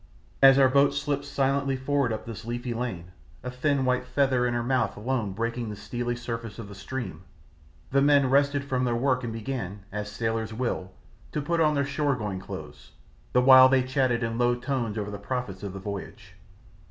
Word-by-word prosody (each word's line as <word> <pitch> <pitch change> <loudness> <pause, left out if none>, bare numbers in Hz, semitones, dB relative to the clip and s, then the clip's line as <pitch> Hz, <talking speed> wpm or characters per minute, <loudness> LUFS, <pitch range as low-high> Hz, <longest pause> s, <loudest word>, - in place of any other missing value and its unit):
As 135 0 +8
our 135 -1 +6
boat 140 +2 +3
slipped 145 0 -2
silently 140 0 0
forward 135 -1 0
up 110 - -4
this 115 -1 -7
leafy 120 +1 -4
lane, 110 -8 -4 0.3
a 125 - -4
thin 135 +1 0
white 125 0 +1
"feather" 130 -1 +1
in 120 - -1
her 120 - 0
mouth 120 -4 0
alone 115 -2 -1
breaking 115 +2 -3
the 105 - -5
steely 120 +3 -3
surface 115 -2 -6
of 115 -3 -7
the 100 - -10
stream, 100 -3 -6 0.7
the 140 +1 +3
men 140 -1 +5
rested 140 +1 +3
from 130 -2 -1
their 120 -2 +1
work 130 +1 +1
and 120 - -3
began, 110 -4 -5
as 105 0 -4
sailors 110 -1 -2
will, 120 -6 -2 0.4
to - - -1
put 165 +3 -1
on 155 -1 +3
their 140 0 +1
shore 140 0 0
going 105 -6 -4
clothes, - - -9 0.4
the 125 - +5
while 130 0 +9
they 130 -1 +3
chatted 130 -2 +1
in 115 +1 -2
low 120 0 +3
tones 120 -3 -2
over 105 -1 -3
the 100 - -6
profits 105 -3 -4
of 100 -1 -5
the 95 - -6
voyage. 100 +1 -7
125 Hz, 200 wpm, -27 LUFS, 110-135 Hz, 0.7 s, while